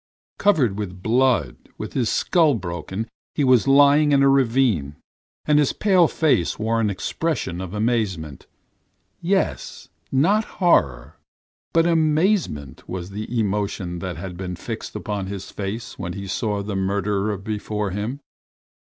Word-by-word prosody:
Covered 135 Hz, -, +2 dB
with 95 Hz, -3 st, -6 dB
blood, 120 Hz, -, +2 dB, 0.2 s
with -, -, -6 dB
his 120 Hz, -4 st, 0 dB
skull 160 Hz, -6 st, +3 dB
broken, 95 Hz, +2 st, -5 dB, 0.3 s
he 145 Hz, -, +1 dB
was 130 Hz, -1 st, +4 dB
lying 145 Hz, +2 st, +5 dB
in 140 Hz, 0 st, +5 dB
a -, -, +5 dB
ravine, 120 Hz, -, +2 dB, 0.5 s
and 150 Hz, -1 st, +4 dB
his 145 Hz, -, +2 dB
pale 185 Hz, -5 st, +4 dB
face 145 Hz, -, +1 dB
wore 115 Hz, +1 st, 0 dB
an 105 Hz, -, +1 dB
expression 100 Hz, -, -2 dB
of 95 Hz, +2 st, -6 dB
amazement. 105 Hz, -, -2 dB, 0.7 s
Yes, 190 Hz, +3 st, -1 dB, 0.2 s
not 190 Hz, +11 st, +3 dB
horror 70 Hz, -, +2 dB, 0.5 s
but 165 Hz, 0 st, +3 dB
amazement 160 Hz, -, +1 dB
was 90 Hz, +1 st, -5 dB
the 110 Hz, +4 st, -3 dB
emotion 100 Hz, -4 st, -2 dB
that 90 Hz, -2 st, -5 dB
had 90 Hz, 0 st, -7 dB
been 90 Hz, -1 st, -5 dB
fixed -, -, -7 dB
upon 100 Hz, -3 st, -3 dB
his 95 Hz, -1 st, -7 dB
face 105 Hz, +4 st, -5 dB
when 90 Hz, -, -4 dB
he 100 Hz, -1 st, -6 dB
saw 105 Hz, +1 st, -2 dB
the 100 Hz, 0 st, -4 dB
murderer 100 Hz, +1 st, 0 dB
before 105 Hz, 0 st, -3 dB
him. 110 Hz, +9 st, -4 dB
105 Hz, 140 wpm, -22 LUFS, 95-140 Hz, 0.7 s, lying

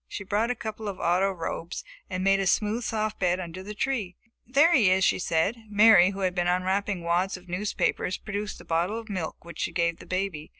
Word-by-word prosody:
She 205 Hz, -, -6 dB
brought 210 Hz, +4 st, 0 dB
a 250 Hz, -, 0 dB
couple 220 Hz, -1 st, -6 dB
of 200 Hz, -, -5 dB
auto 180 Hz, +3 st, +2 dB
robes 170 Hz, -1 st, -5 dB, 0.3 s
and 185 Hz, -, -3 dB
made 195 Hz, 0 st, +4 dB
a 195 Hz, -, 0 dB
smooth, 215 Hz, +5 st, +1 dB
soft 215 Hz, -1 st, -2 dB
bed 180 Hz, -1 st, +1 dB
under 180 Hz, 0 st, -6 dB
the 210 Hz, +2 st, -8 dB
tree. 210 Hz, -7 st, -2 dB, 0.3 s
"There 290 Hz, +7 st, +5 dB
he 225 Hz, -, +5 dB
is!" 190 Hz, +1 st, +3 dB
she -, -, +3 dB
said. 175 Hz, +6 st, +1 dB
Mary, 205 Hz, -3 st, +7 dB
who 200 Hz, 0 st, -6 dB
had 185 Hz, -1 st, +1 dB
been 175 Hz, -1 st, 0 dB
unwrapping 185 Hz, +1 st, 0 dB
wads 180 Hz, +3 st, 0 dB
of 180 Hz, 0 st, -17 dB
newspapers, 185 Hz, 0 st, -1 dB
produced 210 Hz, 0 st, -5 dB
a -, -, -13 dB
bottle 170 Hz, +6 st, 0 dB
of 230 Hz, -1 st, -8 dB
milk 180 Hz, -4 st, -5 dB
which 170 Hz, -, -10 dB
she -, -, -1 dB
gave 170 Hz, -1 st, 0 dB
the -, -, -12 dB
baby. 185 Hz, -5 st, -3 dB
190 Hz, 220 wpm, -27 LUFS, 180-210 Hz, 0.3 s, Mary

